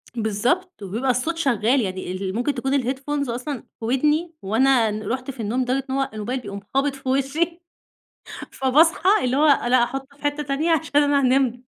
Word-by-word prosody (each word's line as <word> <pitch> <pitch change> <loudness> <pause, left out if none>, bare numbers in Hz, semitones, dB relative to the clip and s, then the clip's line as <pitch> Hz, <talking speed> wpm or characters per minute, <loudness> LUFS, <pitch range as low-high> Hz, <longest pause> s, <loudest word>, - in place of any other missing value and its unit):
بالضبط 240 - -1
وبيبقى 225 +7 -1
الصوت 285 +7 -2
شغال، 255 -4 +2
يعني 185 -3 -4
ال 190 +1 -4
ممكن 245 +5 0
تكون 270 +2 0
الheadphones 275 +2 -2
أصلًا 250 +2 -4 0.2
في 225 - -5
ودني، 300 +7 +1
وأنا 230 +2 +3
ن 215 +1 -5
رُحت 255 +5 -3
في 255 - -17
النوم 225 +4 -1
لدرجة 255 +2 0
إن 265 - -1
هو 270 -1 0
الموبايل 220 +5 -3
بيقوم 200 -4 -7
خابط 275 +1 +1
في 270 -1 -6
وشِّي، 305 +6 0 0.9
فباصحى 315 +8 +3
اللي 255 +1 +1
هو 300 - +4
أنا 255 -3 +4
هاحطه 270 +3 -3
في - - -21
حتة 290 +1 -1
تانية 290 +4 0
عشان 295 -2 +2
أنا 285 0 +3
هانام 255 -2 +1
265 Hz, 185 wpm, -22 LUFS, 235-290 Hz, 0.9 s, هو